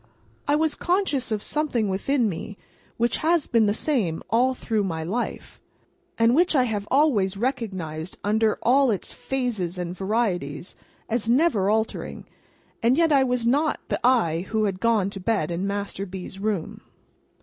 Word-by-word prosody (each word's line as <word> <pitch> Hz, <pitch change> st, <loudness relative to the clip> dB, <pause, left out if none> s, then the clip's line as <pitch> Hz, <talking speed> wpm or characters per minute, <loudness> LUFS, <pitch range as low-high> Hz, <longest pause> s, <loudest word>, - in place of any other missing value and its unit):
I 290 Hz, -, +3 dB
was 315 Hz, 0 st, +1 dB
conscious 350 Hz, -, 0 dB
of 210 Hz, -1 st, -1 dB
something 290 Hz, -8 st, 0 dB
within 230 Hz, +6 st, +1 dB
me, 195 Hz, +2 st, -5 dB, 0.4 s
which 235 Hz, +1 st, +1 dB
has 325 Hz, -1 st, +2 dB
been 225 Hz, -3 st, +3 dB
the -, -, +3 dB
same 210 Hz, -, 0 dB
all 255 Hz, +3 st, +3 dB
through 220 Hz, -4 st, -1 dB
my 165 Hz, -4 st, -3 dB
life, 220 Hz, +9 st, -4 dB, 0.6 s
and 230 Hz, +1 st, +4 dB
which 340 Hz, +3 st, +3 dB
I 260 Hz, -, +5 dB
have 210 Hz, -4 st, -2 dB
always 225 Hz, -10 st, +2 dB
recognised 190 Hz, -, -3 dB
under 215 Hz, +1 st, +2 dB
all 265 Hz, +2 st, +4 dB
its 205 Hz, -4 st, -2 dB
phases 230 Hz, -10 st, -2 dB
and 175 Hz, 0 st, -4 dB
varieties 190 Hz, -6 st, -2 dB, 0.3 s
as 230 Hz, 0 st, -1 dB
never 240 Hz, -, +3 dB
altering, 220 Hz, +1 st, -2 dB, 0.6 s
and 240 Hz, +4 st, +3 dB
yet 330 Hz, -1 st, +3 dB
I 275 Hz, -2 st, +5 dB
was 250 Hz, -2 st, 0 dB
not 290 Hz, +6 st, +2 dB
the -, -, -1 dB
I 190 Hz, -9 st, +2 dB
who 220 Hz, -1 st, +1 dB
had 195 Hz, -3 st, -1 dB
gone 215 Hz, -4 st, +2 dB
to 195 Hz, -, -7 dB
bed 185 Hz, -5 st, 0 dB
in 180 Hz, +3 st, -2 dB
Master 200 Hz, 0 st, -3 dB
B.'s 190 Hz, +1 st, -8 dB
room. 200 Hz, -5 st, -3 dB
220 Hz, 160 wpm, -24 LUFS, 195-255 Hz, 0.6 s, I